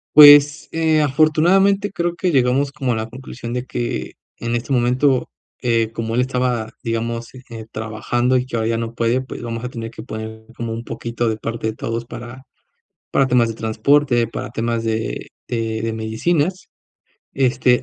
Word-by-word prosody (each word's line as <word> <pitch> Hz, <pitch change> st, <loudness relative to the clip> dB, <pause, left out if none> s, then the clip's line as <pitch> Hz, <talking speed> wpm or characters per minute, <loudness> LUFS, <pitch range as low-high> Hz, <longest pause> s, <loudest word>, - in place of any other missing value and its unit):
Pues, 145 Hz, 0 st, +8 dB
eh, 160 Hz, -1 st, +2 dB
afortunadamente, 170 Hz, +8 st, +3 dB
creo 175 Hz, -2 st, -1 dB
que 180 Hz, 0 st, 0 dB
llegamos 135 Hz, +1 st, +2 dB
como 135 Hz, -4 st, -1 dB
a -, -, -1 dB
la 110 Hz, 0 st, -3 dB
conclusión 125 Hz, -1 st, -8 dB
de 125 Hz, +1 st, -3 dB
que, 120 Hz, -1 st, -3 dB, 0.2 s
en 120 Hz, 0 st, -2 dB
este 120 Hz, +4 st, -3 dB
momento, 125 Hz, +1 st, +2 dB, 0.3 s
eh, 115 Hz, -2 st, +1 dB
como 115 Hz, 0 st, -3 dB
él 125 Hz, -, +3 dB
estaba, 125 Hz, -3 st, -1 dB
digamos, 115 Hz, +1 st, -3 dB
eh, 115 Hz, -1 st, -8 dB
trabajando 115 Hz, +4 st, 0 dB
y 125 Hz, -, -1 dB
que 130 Hz, -, -6 dB
ahora 110 Hz, 0 st, 0 dB
ya 115 Hz, -, 0 dB
no 115 Hz, 0 st, -4 dB
puede, 115 Hz, +2 st, +1 dB
pues 130 Hz, -, -7 dB
vamos 115 Hz, 0 st, -4 dB
a -, -, -3 dB
tener 115 Hz, -2 st, -6 dB
que 110 Hz, -, -9 dB
poner 110 Hz, -1 st, -7 dB
como 115 Hz, -1 st, -4 dB
un 115 Hz, +1 st, -5 dB
poquito 120 Hz, 0 st, -3 dB
de 110 Hz, -, +1 dB
parte 115 Hz, 0 st, -4 dB
de 110 Hz, -, -2 dB
todos 115 Hz, +1 st, -3 dB
para 120 Hz, +2 st, -9 dB, 0.7 s
para 135 Hz, -, +3 dB
temas 120 Hz, -2 st, +3 dB
de -, -, -3 dB
transporte, 120 Hz, +3 st, +2 dB
para 115 Hz, -, -6 dB
temas 115 Hz, 0 st, -2 dB
de 110 Hz, 0 st, -2 dB, 0.2 s
de 115 Hz, -2 st, -2 dB
de 115 Hz, -1 st, -1 dB
medicinas, 145 Hz, +11 st, -1 dB, 0.6 s
este, 125 Hz, -2 st, +3 dB
120 Hz, 180 wpm, -20 LUFS, 115-135 Hz, 0.7 s, Pues